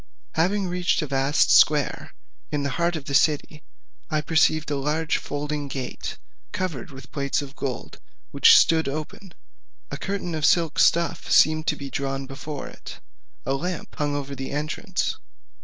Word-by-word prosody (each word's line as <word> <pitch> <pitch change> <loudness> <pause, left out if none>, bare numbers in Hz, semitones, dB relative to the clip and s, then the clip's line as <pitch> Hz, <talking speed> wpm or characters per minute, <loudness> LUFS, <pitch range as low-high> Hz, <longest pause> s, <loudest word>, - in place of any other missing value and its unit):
Having 190 +4 +1
reached 180 -1 0
a - - -1
vast 135 +1 +2
square, 150 -3 +3 0.4
in 145 -1 -1
the 140 - -1
heart 170 0 +2
of 150 -3 -5
the 140 - -5
city, 150 +1 +2 0.5
I 155 -1 0
perceived 155 -1 +2
a - - +1
large 150 +3 0
folding 145 0 -4
gate, 130 -2 -5 0.3
covered 165 -10 -4
with 130 -2 -12
plates 140 0 -1
of 140 0 -11
gold, 130 -4 -5 0.3
which - - +7
stood 160 -1 +4
open; 155 +5 -7 0.6
a - - -4
curtain 195 -3 -3
of 155 -1 -3
silk 165 0 +3
stuff 170 0 +2
seemed 155 0 +4
to 150 - +2
be 140 -2 -8
drawn 135 0 -3
before 140 +2 -7
it: - - -10 0.5
a 135 - 0
lamp 175 +4 -4
hung 145 -1 0
over 140 -1 -4
the 135 -1 -5
entrance. 150 +2 -2
150 Hz, 160 wpm, -24 LUFS, 140-160 Hz, 0.6 s, which